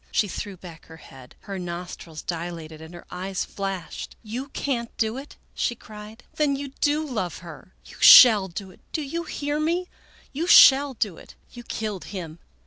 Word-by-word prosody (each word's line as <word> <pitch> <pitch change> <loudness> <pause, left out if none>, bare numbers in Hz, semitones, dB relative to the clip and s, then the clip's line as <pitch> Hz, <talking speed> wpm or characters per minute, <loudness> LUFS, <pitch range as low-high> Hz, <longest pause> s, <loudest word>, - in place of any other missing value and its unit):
She 210 - +1
threw 200 0 -6
back 170 -3 -13
her 160 - -12
head. 130 -5 -15
Her 195 -2 -6
nostrils 170 -2 -7
dilated 165 -2 -6
and 160 +1 -11
her 175 - -12
eyes 190 +1 -3
flashed. 195 -3 -6
" - - -36
You 260 +3 -4
can't 245 -4 -3
do 220 0 0
it! 275 +3 -9
" - - -39
she 240 - -1
cried. 215 +1 -12
" - - -35
Then 295 -2 +2
you 280 0 -5
do 300 +1 +1
love 215 - -3
her! 170 +2 -12
You - - -14
shall 215 -6 +9
do 190 +2 -8
it! - - -20
Do 310 - -2
you 335 +5 -4
hear 290 -1 -3
me? 345 +4 -1 0.4
You 320 +5 -2
shall 275 -4 +7
do 205 -7 -2
it! - - -15 0.2
You 240 - -10
killed 215 -5 -5
him 170 -5 -7
210 Hz, 195 wpm, -24 LUFS, 175-275 Hz, 0.4 s, shall